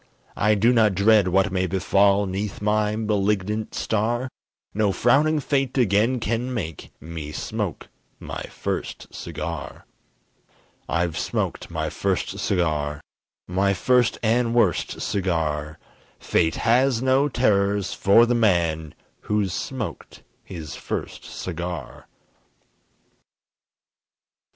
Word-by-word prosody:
I 105 0 +3
do 115 +5 +4
not 110 -5 +4
dread 100 0 +5
what 95 +1 +2
may 95 -1 0
befall 100 +2 +3
'Neath 95 +2 -4
my 105 0 +1
malignant 105 0 -1
star, 120 +4 -1 0.4
No 105 -1 +2
frowning 150 +9 +3
fate 135 -2 -1
again 115 +2 +3
can 115 +3 -2
make 85 - -5
Me 80 -1 -7
smoke - - -4 0.3
my - - -6
first - - -5
cigar. - - -6 1.0
I've 85 -1 0
smoked - - -2
my - - -3
first - - -2
cigar! 75 -5 0 0.5
My 95 +2 +1
first 125 +4 +2
and 115 +1 +2
worst 105 -9 +1
cigar! 80 -5 -1 0.4
Fate 80 -1 +1
has 125 +1 +2
no 135 +2 +3
terrors 100 -5 +1
for 105 +4 +5
the 120 - +1
man 85 -9 +1 0.3
Who's 105 -4 +1
smoked 130 0 -5 0.2
his 80 -5 -7
first - - -5
cigar! 85 -1 -6
100 Hz, 110 wpm, -24 LUFS, 90-115 Hz, 1.0 s, dread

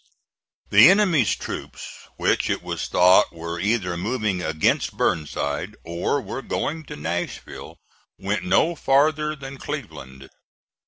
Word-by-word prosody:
The 110 +9 +9
enemy's 180 - +3
troops, - - -8
which - - +1
it - - -2
was - - -4
thought 90 +1 +5
were 85 +1 -6
either 100 -3 0
moving 105 0 -2
against 80 -3 0
Burnside 70 -3 -2
or 85 +11 -1
were 130 +2 -6
going 160 +3 -3
to - - -8
Nashville, 85 +4 -5 0.4
went 100 +3 -2
no 175 -2 +2
farther 150 +1 +2
than 135 -1 -9
Cleveland. 70 - -8
105 Hz, 120 wpm, -23 LUFS, 85-145 Hz, 0.4 s, The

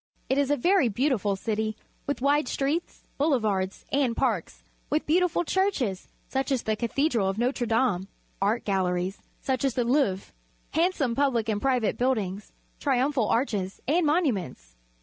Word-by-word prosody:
It 265 - +2
is 280 -1 +1
a 290 - +2
verj' 345 - +3
beautiful 215 -4 +1
citj, 215 +1 -2 0.3
with 285 -3 -2
wide 285 0 +3
streets, 285 +7 -2 0.2
boulevards, 215 -10 0
and 270 -4 +1
parks, - - -1 0.3
with 300 - 0
beautiful 350 +2 +2
church 380 +3 +1
es, 195 -7 -2 0.2
such 270 +1 -2
as 260 -3 +1
the 220 - 0
Cathedral 235 -2 +1
of 195 - -3
Notre 245 +1 0
Dame, 225 -5 +1 0.3
art 210 +4 +1
galleries, 185 -1 0 0.2
such 260 -1 -1
as 270 -4 +1
the 245 - +2
Louvre, 235 -7 +1 0.4
hand.some 320 -7 +1
pubUc 245 -5 +1
and 205 -1 -1
private 255 -5 +1
buildings, 210 -6 -1 0.3
triumphal 265 -3 +1
arches 205 -6 0
and 335 +6 +3
monuments. 195 - -1
245 Hz, 150 wpm, -27 LUFS, 205-285 Hz, 0.4 s, verj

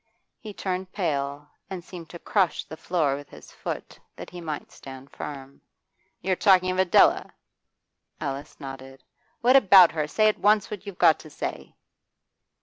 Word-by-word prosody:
He 215 - -8
turned 185 -1 -4
pale, 145 -6 -2 0.2
and 185 -3 -6
seemed 170 -3 -10
to 170 - -9
crush 190 +1 0
the - - -10
floor 160 -4 0
with 145 0 -10
his - - -14
foot, - - -7 0.2
that - - -10
he 175 0 -8
might 155 -3 -6
stand 135 0 -12
firm. 135 -1 -9 0.6
'You're 190 -1 0
talking 185 -2 +4
of 185 - -2
Adela?' 190 -2 +4 0.9
Alice 140 +1 -6
nodded. 135 -1 -10 0.4
'What 250 +2 +5
about 195 -8 +8
her? 155 -2 -2
Say 215 +8 +2
at 215 - +1
once 210 0 +3
what 205 -1 -7
you've 195 -3 -7
got 160 - +5
to 155 - -12
say. - - -6
175 Hz, 160 wpm, -25 LUFS, 145-190 Hz, 0.9 s, about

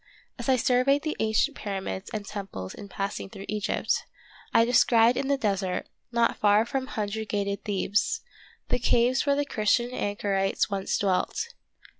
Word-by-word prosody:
As - - -3
I 260 - +6
surveyed 255 +3 +3
the 310 - -2
ancient 220 +7 +2
pyramids 195 -1 -4
and 215 -3 -4
temples 195 - -6
in 200 - -10
passing 195 0 -4
through 195 +1 -9
Egypt, 210 -1 -1 0.5
I 230 - +5
descried 235 -1 +5
in 270 - -1
the 280 0 +2
desert, 195 -6 -1 0.3
not 235 -1 +2
far 210 -1 +4
from 260 +2 -2
hundred 220 -3 -3
gated 200 -1 -1
Thebes, 205 - 0 0.5
the - - +1
caves 245 +3 +2
where 280 - +4
the 290 0 0
Christian 235 0 +1
anchorites 205 -3 0
once 195 -1 -1
dwelt. 200 - 0
215 Hz, 155 wpm, -27 LUFS, 200-250 Hz, 0.5 s, I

